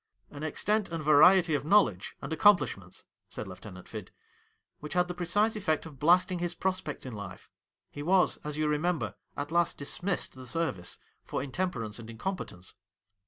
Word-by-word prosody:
' - - -40
An 145 - -9
extent 205 +7 0
and 165 -2 -4
variety 165 +3 +6
of 145 - +1
knowledge 150 - +3
and 145 +4 -3
accomplishments,' 160 - +3 0.3
said 105 - -6
Lieutenant 95 0 -10
Fid, 105 -4 -7 0.4
' - - -45
which 150 - -6
had 180 0 +2
the 180 - -4
precise 195 +6 +1
effect 160 -8 0
of 150 -5 -11
blasting 180 +4 +4
his 175 0 -2
prospects 185 -7 -2
in 130 - -6
life. 100 -3 -9 0.4
He 145 - -7
was, 180 +4 +3
as 150 0 -6
you 155 0 +1
remember, 150 - 0 0.2
at 145 +2 -4
last 170 0 +2
dismissed 175 +6 -2
the 130 -1 -10
service 120 - -2 0.3
for - - -3
intemperance 130 - -3
and 115 -1 -9
incompetence.' 115 - -5
155 Hz, 170 wpm, -30 LUFS, 120-180 Hz, 0.4 s, variety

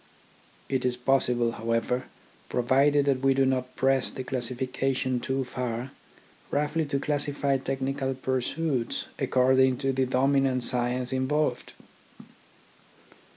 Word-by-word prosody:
It 130 -1 -1
is 125 -1 0
possible, 125 -2 +2
however, 115 +2 -1 0.4
provided 140 +4 +3
that 135 -2 +2
we 135 0 +3
do 135 0 +3
not 130 -1 -1
press 135 -1 +2
the 130 - -6
classification 130 +1 -1
too 130 +2 -1
far, 125 0 -4 0.6
roughly 150 +2 0
to 140 -1 -1
classify 145 -1 0
technical 135 0 -2
pursuits 130 +1 -1
according 130 0 +3
to 135 0 -1
the 130 0 +1
dominant 135 0 +2
science 125 +1 -1
in 130 0 0
volved. 150 -4 -1
130 Hz, 115 wpm, -27 LUFS, 125-135 Hz, 0.6 s, provided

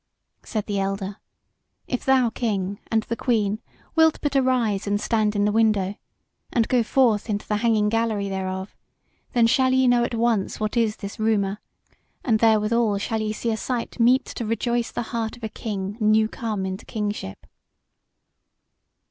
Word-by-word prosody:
Said 215 -4 -3
the 205 -2 -2
elder: 195 +1 -3 0.7
"If 250 - -3
thou, 260 -3 +4
King, 200 -4 -2
and 220 -1 +1
the 230 - -3
Queen, 215 -4 0 0.3
wilt 320 -1 +5
but 290 -1 -1
arise 250 -7 +1
and 205 0 +1
stand 215 -1 +1
in 205 0 +2
the 210 - +2
window, 210 -3 +2 0.6
and 230 -2 +2
go 250 -2 +3
forth 230 -3 +2
into 205 -1 -2
the 210 - 0
hanging 215 -1 +2
gallery 220 -2 0
thereof, 190 0 -4 0.6
then 235 -2 +4
shall 260 +3 +3
ye 260 0 +4
know 245 -1 +4
at 240 - -2
once 230 -3 0
what 215 +1 -2
is 225 -3 +2
this 200 0 -8
rumour, 210 -2 +1 0.6
and 225 -4 +2
therewithal 220 -1 +3
shall 220 +2 -2
ye 215 0 -1
see 230 +2 -2
a 220 - -1
sight 245 +1 -4
meet 250 +3 +4
to - - -5
rejoice 235 +1 -1
the - - -3
heart 230 0 -2
of 240 - -18
a 220 - -2
king 205 -2 -5
new 215 0 +4
come 215 -4 -3
into 190 0 -5
kingship." 205 - -4
220 Hz, 170 wpm, -24 LUFS, 205-235 Hz, 0.7 s, wilt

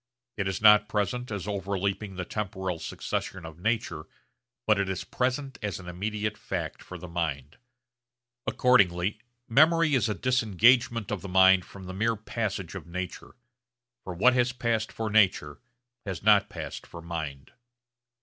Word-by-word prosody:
It 100 -2 -2
is 95 +2 -3
not 105 -1 +7
present 120 +4 -1
as 100 -2 -4
overleaping 100 0 -2
the 90 -1 -4
temporal 95 -4 -3
succession 90 +1 -4
of 80 0 -10
nature, 110 -6 -2 0.6
but 105 -2 +3
it 100 -1 0
is 95 -1 -3
present 130 +2 -2
as 105 -4 -3
an 90 - -11
immediate 105 +4 -3
fact - - -4
for 90 - -9
the 90 +1 -9
mind. 80 -4 -4 0.9
Accordingly 100 -5 +3 0.3
memory 160 +5 +4
is 120 -4 +2
a 105 - -1
disengagement 120 -1 +3
of 105 -4 -2
the 100 - -7
mind 95 0 +5
from 100 0 -12
the 95 - -7
mere 115 +4 +1
passage 105 -4 -4
of 95 -3 -8
nature; 90 +2 -6 0.7
for 90 - -6
what 125 +8 +5
has 125 0 +2
passed 115 -3 -1
for 110 -1 -4
nature 95 -8 +2 0.5
has 95 -2 -4
not 105 -1 +5
passed - - -7
for 85 -1 -10
mind. 80 -5 -6
100 Hz, 155 wpm, -27 LUFS, 90-115 Hz, 0.9 s, not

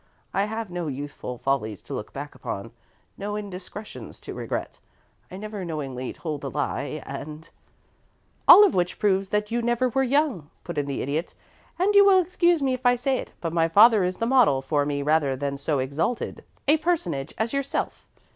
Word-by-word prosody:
I 195 - +2
have 220 -2 -5
no 175 -2 -3
youthful 140 -2 -5
follies 115 -6 -2
to - - -8
look - - -5
back - - -7
upon, - - -6 0.5
no 205 +1 -3
indiscretions 205 +1 -8
to - - -7
regret; - - -4 0.5
I 185 - -8
never 210 -1 -6
knowingly 135 -6 -4
told 155 -4 -5
a - - -3
lie, - - -3
and 155 +1 -7 0.5
" - - -40
"All 415 - +11
of 390 - +1
which 180 0 0
proves 195 -2 +1
that 210 +1 -1
you 240 +1 0
never 240 +2 +1
were 270 +3 +1
young," 265 - +1
put 170 -4 -3
in 145 - -2
the 140 - -2
Idiot; 150 +6 -3 0.4
"and 380 +4 +2
you 405 0 +8
will 395 -1 +6
excuse 345 -3 +2
me 265 -1 +2
if 255 0 -4
I 245 0 +5
say 255 +2 0
it, - - -8
but 165 -1 -3
my 165 -1 +3
father 210 +4 +6
is 180 0 -1
the 230 - -1
model 230 - +4
for 145 +1 0
me 140 -1 -1
rather 150 -2 +2
than 140 +1 -3
so 140 +1 -1
exalted 140 - -2 0.2
a 300 +3 +5
personage 310 - -1
as 225 +3 -1
yourself. 275 0 -2
190 Hz, 195 wpm, -25 LUFS, -, 0.5 s, All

